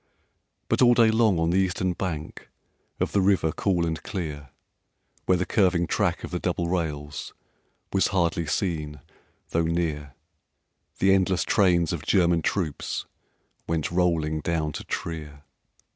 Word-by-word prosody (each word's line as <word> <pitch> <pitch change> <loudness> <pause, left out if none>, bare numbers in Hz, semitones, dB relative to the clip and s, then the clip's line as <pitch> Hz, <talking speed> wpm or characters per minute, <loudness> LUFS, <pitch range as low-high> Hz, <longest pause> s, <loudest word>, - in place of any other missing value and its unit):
But - - +1
all 120 -1 +6
day 115 -2 +5
long 110 -4 +3
on 80 +1 +1
the 95 - +3
eastern 95 -1 0
bank 80 -4 -5 0.5
Of - - 0
the 100 - +2
river 95 -5 +2
cool 90 0 0
and 80 -2 -3
clear, 75 -7 -5 0.8
Where 90 - +4
the 90 - -1
curving 90 -4 +2
track 90 -1 0
of - - -6
the 90 - -2
double 85 -1 -1
rails 75 -5 -3 0.6
Was 95 - +3
hardly 85 -3 0
seen 75 -4 -2 0.5
though 85 - +2
near, 80 -4 -2 0.8
The 95 0 +4
endless 95 -1 +2
trains 85 -5 +2
of - - -3
German 85 -3 +3
troops 80 -4 -2 0.6
Went 80 -1 -1
rolling 85 -3 +1
down 80 -1 -1
to - - -6
Trier. 75 -3 -5
85 Hz, 145 wpm, -25 LUFS, 80-95 Hz, 0.8 s, all